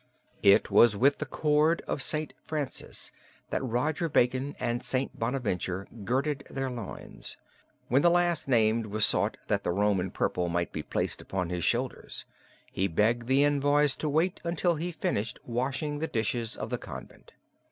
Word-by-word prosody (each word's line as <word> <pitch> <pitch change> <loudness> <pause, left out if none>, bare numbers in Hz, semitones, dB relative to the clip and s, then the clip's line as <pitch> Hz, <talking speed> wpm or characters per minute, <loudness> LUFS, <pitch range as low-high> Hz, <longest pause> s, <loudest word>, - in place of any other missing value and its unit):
It 100 +1 +5
was 105 +1 +6
with 140 +6 +3
the 150 - -3
cord 150 +4 +2
of - - -2
St. 155 +4 0
Francis 150 -4 -4 0.4
that - - -1
Roger 150 +7 0
Bacon 130 +2 +1
and 120 +1 -1
St. 130 +1 -2
Bonaventure 105 -6 -2 0.2
girded 140 +5 0
their 135 -1 -3
loins; 115 -5 -7 0.5
when 130 +4 +3
the 175 - +6
last 175 -3 +2
named 115 -3 +3
was 105 +1 +4
sought - - +2
that - - 0
the - - -1
Roman 95 0 +1
purple 90 0 -1
might 85 0 -1
be - - -3
placed - - -2
upon 90 -2 -3
his 90 -2 -2
shoulders, - - -1 0.5
he 95 - 0
begged 115 +7 +1
the 135 +2 +4
envoys 145 0 +3
to 155 - -2
wait 165 +5 +1
until 175 +1 +1
he 175 +3 -3
finished 110 -9 -2
washing 135 +5 -2
the 160 - -1
dishes 115 -1 -2
of - - -5
the - - -1
convent. - - -10
130 Hz, 165 wpm, -29 LUFS, 110-150 Hz, 0.5 s, was